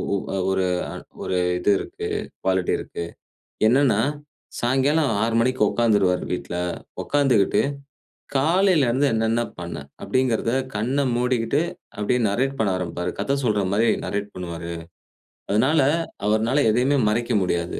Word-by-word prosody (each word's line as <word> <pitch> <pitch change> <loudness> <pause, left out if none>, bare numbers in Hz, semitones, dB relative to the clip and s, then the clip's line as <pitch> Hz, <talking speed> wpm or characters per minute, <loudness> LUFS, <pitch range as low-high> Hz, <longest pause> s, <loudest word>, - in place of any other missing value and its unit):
ஒ - - +2 0.4
ஒரு 95 -1 +1 0.6
ஒரு 90 - 0 0.2
இது 95 +3 +2
இருக்கு, - - -6 0.3
குவாலிட்டி 95 -1 +1
இருக்கு. 85 - -6 0.6
என்னென்னா, 125 -3 +4 0.6
சாயங்காலம் 135 +3 +2
6:00 115 0 0
மணிக்கு 130 +1 0
உட்கார்ந்துருவாரு 100 -6 +2
வீட்ல. 90 -1 -4 0.5
உட்கார்ந்துக்கிட்டு 135 -9 +3 0.7
காலையில 165 +1 +3
இருந்து 130 +5 +2
என்னென்ன 115 +1 +1 0.2
பண்ண? 85 -1 -5 0.3
அப்பிடிங்கிறத 125 -3 0 0.2
கண்ண 125 +7 0
மூடிக்கிட்டு 125 +1 +1 0.4
அப்பிடியே 125 +4 +1
நரேட் 130 +7 0
பண்ண 110 - +2
ஆரம்பிப்பாரு. 90 0 -3
கத 140 - 0
சொல்றமாரி 105 -1 +1 0.2
நரேட் 100 0 -3
பண்ணுவாரு. 85 -2 -6 0.8
அதனால, 135 +9 +3 0.4
அவருனால 110 +6 +2
எதையுமே 125 +6 +2
மறைக்க 120 +3 0
முடியாது. 85 -2 -1
115 Hz, 115 wpm, -23 LUFS, 100-130 Hz, 0.8 s, என்னென்னா